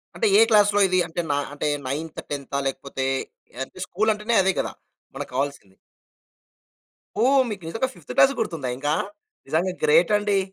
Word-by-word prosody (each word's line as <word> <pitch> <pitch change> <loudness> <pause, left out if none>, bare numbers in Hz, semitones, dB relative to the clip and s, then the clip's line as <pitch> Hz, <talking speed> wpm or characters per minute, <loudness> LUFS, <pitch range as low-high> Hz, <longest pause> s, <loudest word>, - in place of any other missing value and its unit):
అంటే, 220 - +1
ఏ - - +8
క్లాస్‌లో 205 -1 +5
ఇది 185 0 +2
అంటే 175 +1 -3
నా 145 - +1 0.2
అంటే 145 - -2 0.2
నైన్త్, 155 +4 -4
టెన్తా 140 0 -3
లేకపోతే, 135 0 -4 0.6
అంటే 130 - -13
స్కూలంటేనే 215 +3 0
అదే 190 0 +3
కదా! - - -2 0.4
మనకు - - -6
కావాల్సింది. 135 -8 -3 1.5
ఓహ్! 270 +2 +5
మీకు 200 -4 -6
నిజంగా 225 +10 -1
ఫిఫ్త్ 150 -7 -9
క్లాస్‌ది 275 0 +5
గుర్తుందా 165 - -2
ఇంకా! 145 +2 0 0.5
నిజంగా 180 +4 0
గ్రేట్ 465 - +5
అండి. 205 -1 +1
180 Hz, 150 wpm, -24 LUFS, 145-215 Hz, 1.5 s, ఏ